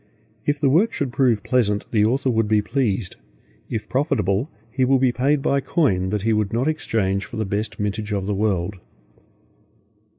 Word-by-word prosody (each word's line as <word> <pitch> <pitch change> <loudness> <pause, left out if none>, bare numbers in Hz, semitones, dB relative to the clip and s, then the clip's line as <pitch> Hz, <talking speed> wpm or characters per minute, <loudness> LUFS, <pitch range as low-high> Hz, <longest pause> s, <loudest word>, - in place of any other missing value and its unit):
If 145 0 +1
the 140 - +2
work 190 +10 +3
should 135 -4 -2
prove 120 -6 +2
pleasant, 105 -5 +1
the 105 -2 +3
author 130 +3 +1
would 115 -2 +1
be 105 -1 +2
pleased; 105 -5 -1 0.5
if 110 -2 -4
profitable, 125 - 0 0.2
he 130 +3 0
will 135 +1 +4
be 130 -1 +3
paid 135 +3 +1
by 140 - +2
coin 100 - +1
that 105 0 -2
he 115 0 +2
would 105 -1 0
not 120 +5 0
exchange 100 -11 0
for - - -8
the 110 - -1
best 100 +3 -3
mintage 105 +1 -2
of 100 -2 -1
the 105 - -1
world. 100 -2 -1
110 Hz, 185 wpm, -22 LUFS, 100-130 Hz, 0.5 s, will